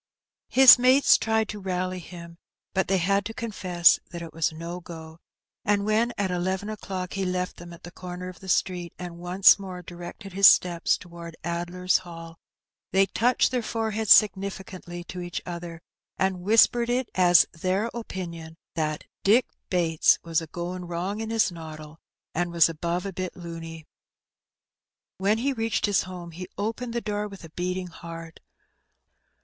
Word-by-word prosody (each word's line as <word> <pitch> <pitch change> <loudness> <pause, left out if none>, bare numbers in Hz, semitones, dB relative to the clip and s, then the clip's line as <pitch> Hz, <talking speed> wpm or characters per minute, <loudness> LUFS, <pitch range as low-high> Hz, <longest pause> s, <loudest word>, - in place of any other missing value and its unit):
His 260 -1 +9
mates 255 +3 +6
tried 220 -1 +1
to 210 - -5
rally 185 -1 -2
him, 170 -1 -11 0.3
but 190 -1 +1
they 195 - +2
had 195 +3 +1
to 225 - -6
confess 185 -6 +3
that 170 -1 -7
it 165 - -9
was 165 0 +1
''no 170 +2 -7
go"; 160 -1 -10 0.4
and 205 -1 +1
when 220 +3 +2
at 195 -2 -1
eleven 185 +3 -2
o'clock 190 -3 -5
he 195 - -2
left 180 0 -2
them 175 0 -10
at 170 - -13
the 175 - -9
comer 180 0 -7
of 185 - -9
the 190 - -10
street, 180 -2 0
and 175 -1 -8
once 185 +3 +5
more 185 -2 -7
directed 175 +3 -9
his 195 +1 +7
steps 175 -2 +4
towards 170 -2 -11
Addler's 175 +2 0
Hall, 165 -2 -11 0.5
they 195 +1 +4
touched 245 +6 +2
their 250 -1 0
foreheads 220 -1 -2
significantly 190 -3 +2
to 180 +1 -7
each 175 0 -4
other, 170 -1 -7 0.3
and 190 -1 0
whispered 230 +4 +4
it 250 0 0
as 180 -2 +6
their 185 +7 -1
opinion 170 -8 -7 0.2
"that 155 -2 -2 0.2
Dick 230 +5 +5 0.2
Bates 165 -3 +3
was 165 -1 0
a 165 - -8
goin' 180 +3 -5
wrong 180 +5 -3
in 220 - -4
his 225 -4 +2
noddle, 155 -2 -10 0.3
and 175 +1 -1
was 170 -1 +5
above 170 +2 -3
a 195 - -4
bit 185 0 -5
luny.*' 165 -2 -8 1.3
When 200 +3 +2
he 270 +4 0
reached 225 -2 0
his 205 -2 +2
home, 180 -2 -8
he 180 +2 -8
opened 230 +4 -3
the 235 - -1
door 210 -1 -3
with 195 -3 -12
a 165 - -11
beating 180 +2 -3
heart. 165 -1 -10
180 Hz, 165 wpm, -26 LUFS, 170-200 Hz, 1.3 s, His